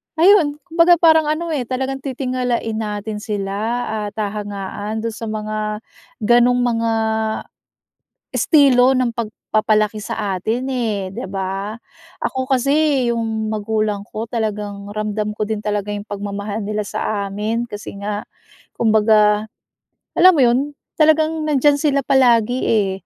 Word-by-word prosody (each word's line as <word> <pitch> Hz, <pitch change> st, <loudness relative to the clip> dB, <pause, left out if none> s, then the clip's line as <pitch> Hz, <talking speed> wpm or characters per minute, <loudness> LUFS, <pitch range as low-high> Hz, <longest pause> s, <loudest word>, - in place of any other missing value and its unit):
ayun, 320 Hz, -4 st, +4 dB
kumbaga 345 Hz, 0 st, +4 dB
parang 320 Hz, -2 st, +6 dB
ano, 320 Hz, +3 st, -1 dB
eh, 275 Hz, -5 st, -1 dB
talagang 265 Hz, +2 st, -2 dB
titingalain 250 Hz, -4 st, -2 dB
natin 210 Hz, 0 st, -4 dB
sila 200 Hz, -2 st, -3 dB, 0.5 s
at 205 Hz, -, -8 dB
hahangaan 205 Hz, 0 st, -4 dB
dun 230 Hz, -1 st, -3 dB
sa 225 Hz, -, -6 dB
mga 215 Hz, 0 st, -4 dB, 0.7 s
gano'ng 240 Hz, +2 st, +4 dB
mga 230 Hz, -1 st, 0 dB, 1.4 s
estilo 265 Hz, -4 st, +5 dB
ng 245 Hz, -2 st, 0 dB
pagpapalaki 215 Hz, -1 st, 0 dB
sa 205 Hz, -2 st, -3 dB
atin, 225 Hz, +8 st, -2 dB
eh, 225 Hz, -7 st, -1 dB
'di -, -, -5 dB
ba? 195 Hz, +3 st, -4 dB, 0.4 s
Ako 260 Hz, +1 st, -3 dB
kasi, 275 Hz, +1 st, +2 dB
yung 220 Hz, -1 st, -2 dB
magulang 215 Hz, -1 st, -1 dB
ko 220 Hz, +1 st, -4 dB
talagang 210 Hz, -3 st, -4 dB
ramdam 215 Hz, 0 st, -2 dB
ko 215 Hz, -, 0 dB
din 215 Hz, -1 st, -3 dB
talaga 210 Hz, -1 st, -2 dB
yung 205 Hz, -, -4 dB
pagmamahal 205 Hz, 0 st, -4 dB
nila 210 Hz, 0 st, -1 dB
sa 200 Hz, 0 st, -3 dB
amin 215 Hz, +4 st, -2 dB
kasi 205 Hz, 0 st, -7 dB
nga 205 Hz, 0 st, -3 dB, 0.5 s
kumbaga, 215 Hz, -1 st, +3 dB, 0.7 s
alam 370 Hz, +2 st, +8 dB
mo 300 Hz, -, +2 dB
yun, 240 Hz, +1 st, +4 dB, 0.4 s
talagang 315 Hz, 0 st, +3 dB
nandiyan 290 Hz, -1 st, +3 dB
sila 280 Hz, -2 st, +2 dB
palagi, 245 Hz, -3 st, +3 dB
eh. 205 Hz, -4 st, +2 dB
220 Hz, 130 wpm, -19 LUFS, 210-260 Hz, 1.4 s, alam